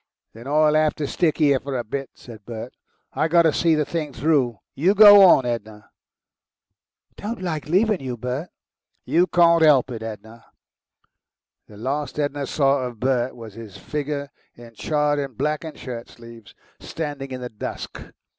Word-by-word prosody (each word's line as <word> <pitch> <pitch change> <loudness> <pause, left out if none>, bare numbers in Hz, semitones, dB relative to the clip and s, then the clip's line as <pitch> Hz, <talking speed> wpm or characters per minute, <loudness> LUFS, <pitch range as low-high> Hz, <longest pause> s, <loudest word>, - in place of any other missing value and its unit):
"Then 115 +3 -11
I'll 150 +1 +3
have 155 0 +2
to 150 - -3
stick 160 +2 0
'ere 140 -3 +3
for 135 -1 -4
a 120 - -3
bit," 135 +4 -5
said 110 -4 -13
Bert. 115 +2 -8 0.4
"I 155 - 0
got 170 +1 +4
to 160 -2 +3
see 165 -2 +2
the 150 -1 0
thing 155 -3 -4
through. 130 -4 +1 0.2
You 180 +9 +2
go 205 -1 +9
on, 155 -8 +6
Edna." 110 -3 -5 1.3
"Don't 225 +3 -5
like 160 -5 -4
leavin' 205 +3 +2
you, 130 -2 -5
Bert." 125 +8 -4 0.6
"You 175 +2 +2
can't 170 -2 +4
'elp 140 -5 +4
it, 115 -2 -6
Edna."... 110 +1 -9 1.2
The 105 - -15
last 140 +7 -4
Edna 145 -1 -2
saw 140 -2 +1
of 125 -3 -6
Bert 130 0 0
was 115 -3 -10
his 110 -3 -11
figure, 145 -1 -4 0.2
in 120 -1 -14
charred 150 +4 0
and 135 -4 -5
blackened 150 +3 -3
shirtsleeves, 115 -2 -10 0.2
standing 145 -4 -6
in 130 -1 -6
the 125 - -5
dusk. 105 - -7
140 Hz, 165 wpm, -22 LUFS, 120-155 Hz, 1.3 s, go